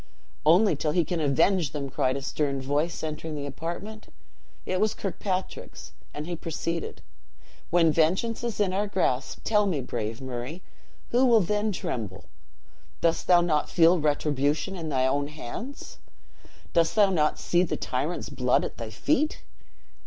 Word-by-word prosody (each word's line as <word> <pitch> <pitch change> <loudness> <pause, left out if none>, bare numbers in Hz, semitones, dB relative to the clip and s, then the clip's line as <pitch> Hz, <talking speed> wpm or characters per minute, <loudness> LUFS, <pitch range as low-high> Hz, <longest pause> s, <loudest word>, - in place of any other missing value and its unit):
"Only 180 +3 +6
till 150 +1 -1
he 175 -1 +2
can 175 +1 -2
avenge 155 +2 +2
them!" 140 -2 -3
cried 130 0 +1
a 135 - -6
stern 140 -1 -1
voice, 145 +6 -1
entering 155 0 -4
the 145 -1 -4
apartment. 170 +10 -6 0.5
It 185 - -1
was 215 0 +2
Kirkpatrick's, 190 -1 -4 0.2
and 150 +1 -5
he 175 +1 -3
proceeded: 165 +1 -4 0.7
"When 170 -2 +4
vengeance 185 +10 +1
is 235 -3 -3
in 195 -3 +2
our 205 +2 0
grasp, 150 -9 -1
tell 210 -2 +3
me, 170 -7 0
brave 115 -3 -4
Murray, 130 +6 -6 0.5
who 245 +2 +3
will 235 -2 +6
then 210 +4 0
tremble? 130 - -4 0.8
Dost 165 -1 +1
thou 175 -1 +6
not 155 -4 +1
feel 170 +1 +5
retribution 150 +3 0
in 165 -3 -5
thine 130 -2 +2
own 140 +2 0
hands? 155 - -8 0.7
Dost 165 -1 +3
thou 205 -3 +5
not 155 -4 +2
see 175 - +2
the 180 - -1
tyrant's 140 +7 -2
blood 125 -3 +2
at - - -7
thy 115 -1 -5
feet?" 310 - 0
165 Hz, 155 wpm, -27 LUFS, 145-190 Hz, 0.8 s, Only